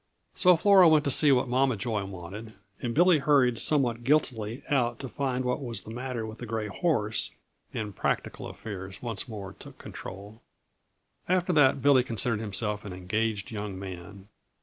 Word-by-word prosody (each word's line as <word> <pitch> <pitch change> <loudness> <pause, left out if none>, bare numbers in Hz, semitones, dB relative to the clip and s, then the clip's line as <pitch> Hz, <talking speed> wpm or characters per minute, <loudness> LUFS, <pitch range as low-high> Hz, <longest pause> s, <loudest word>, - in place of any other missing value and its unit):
So 180 -2 +5
Flora 195 0 +6
went 155 -2 +5
to 140 - 0
see 145 +3 +5
what 130 0 +3
Mama 130 0 +2
Joy 110 -2 -2
wanted, 95 +4 -9 0.3
and 120 -2 -3
Billy 175 0 +5
hurried 135 -5 +3
somewhat 120 -6 +2
guiltily 120 -4 0
out 120 -5 +1
to 135 - -7
find 130 0 -2
what 125 +3 -1
was 115 -6 -3
the 110 - -10
matter 125 -2 -4
with 110 0 -9
the 120 - -7
gray 110 -1 -2
horse, 110 - +1 0.4
and 105 -3 -5
practical - - -2
affairs 95 -2 -8
once 115 -2 -4
more 105 -5 -7
took - - -13
control. 100 +4 -10 0.9
After 180 0 +2
that, 135 -3 +4
Billy 140 -2 +6
considered 115 -2 -1
himself 105 0 -1
an 100 - -7
engaged 105 +3 -2
young 105 -3 -5
man. 95 +1 -9
115 Hz, 170 wpm, -28 LUFS, 105-135 Hz, 0.9 s, Flora